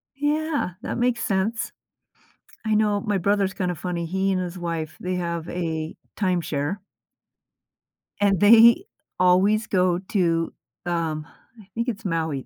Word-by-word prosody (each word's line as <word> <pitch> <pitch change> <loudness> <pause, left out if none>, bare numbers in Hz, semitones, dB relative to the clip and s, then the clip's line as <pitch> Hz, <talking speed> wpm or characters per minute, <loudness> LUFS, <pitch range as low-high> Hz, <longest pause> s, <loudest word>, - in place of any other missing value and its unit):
Yeah. 295 - 0
That - - -4
makes 245 0 +1
sense. 215 +3 -1 0.9
I 220 -1 +1
know 210 -1 +2
my 210 -3 0
brother's 200 +1 +1
kinda 180 -2 -1
funny, 170 +1 -3
he 190 +3 0
and 185 - 0
his 180 0 -5
wife, 165 -3 -4
they 185 0 -2
have 170 -2 -3
a 160 -2 -3 0.2
timeshare 175 -3 -1 1.4
and 200 -3 +3
they 230 - +7 0.4
always 195 +4 +4
go 180 -2 +2
to, 170 -5 +1 0.3
um 165 -3 -2 0.3
I 195 - -18
think 235 +2 -1
it's 220 -2 -5
Maui 160 -6 -1
185 Hz, 135 wpm, -24 LUFS, 170-210 Hz, 1.4 s, they